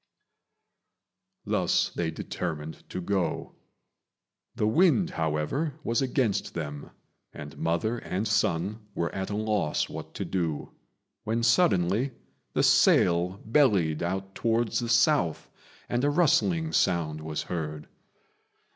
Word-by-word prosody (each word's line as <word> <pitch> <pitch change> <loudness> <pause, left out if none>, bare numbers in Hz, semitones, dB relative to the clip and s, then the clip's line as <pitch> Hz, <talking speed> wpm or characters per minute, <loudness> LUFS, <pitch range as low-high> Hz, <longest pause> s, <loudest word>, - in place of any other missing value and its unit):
Thus - - +1
they 85 -2 -2
determined 80 -1 -5
to - - -4
go. 90 0 -2 1.0
The - - 0
wind, 170 - +3
however, 80 - -1
was 115 +2 0
against 125 -5 0
them, 75 -3 -5 0.4
and - - -9
mother 85 +9 0
and 100 +2 -3
son 100 0 0 0.2
were 85 - -2
at 95 0 -3
a 105 - -2
loss 105 -7 0
what - - -8
to - - -3
do, 85 -6 -2 0.5
when 115 +2 -1
suddenly 115 - +3 0.4
the - - +2
sail 90 +2 +4
bellied 105 - +3
out 95 +2 -3
towards 115 +1 0
the 120 -1 -3
south, 120 - +2 0.4
and 120 +2 -1
a 145 - +3
rustling 165 +1 +2
sound 80 -4 +1
was 75 -1 -4
heard. 75 -3 -5
95 Hz, 120 wpm, -27 LUFS, 85-120 Hz, 1.0 s, sail